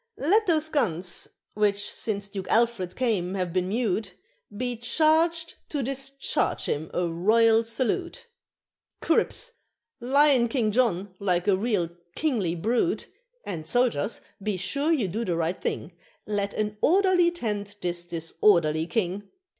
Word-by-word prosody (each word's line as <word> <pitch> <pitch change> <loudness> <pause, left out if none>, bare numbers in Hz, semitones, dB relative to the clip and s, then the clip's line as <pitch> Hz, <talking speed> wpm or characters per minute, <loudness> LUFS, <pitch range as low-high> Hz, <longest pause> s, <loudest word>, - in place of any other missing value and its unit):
Let 410 +9 +3
those 315 -3 +2
guns 185 - -2 0.3
which 205 -1 +1
since 205 -2 -3
Duke 195 -2 -6
Alfred 225 -6 +1
came 200 -7 0
have 180 -3 -2
been 180 0 0
mute 210 -3 -1 0.4
Be 245 +1 -2
charged 320 +7 +2 0.2
to 290 -3 -2
discharge 275 +1 -1
him 155 +2 -2
a 180 - 0
royal 220 +7 +3
salute, 310 - -2 0.7
Cripps! - - 0 0.5
lion 270 0 +4
King 225 -3 0
John, 205 -5 +1
like 180 -2 0
a 200 - +5
real 195 -5 0 0.2
kingly 220 - 0
brute; 235 - 0 0.4
And 160 -5 -5
soldiers! 235 - 0 0.2
be 205 -1 -1
sure 280 - 0
you 265 -11 +2
do 215 +6 -3
the 180 -6 -1
right 170 +2 -1
thing, 165 - -3 0.3
Let 205 -1 -2
an 210 0 -2
orderly 370 -1 +4
tend 210 -11 -4
this 175 -1 -2
disorderly 165 -1 +1
king! 200 -1 -2
215 Hz, 135 wpm, -26 LUFS, 185-265 Hz, 0.7 s, a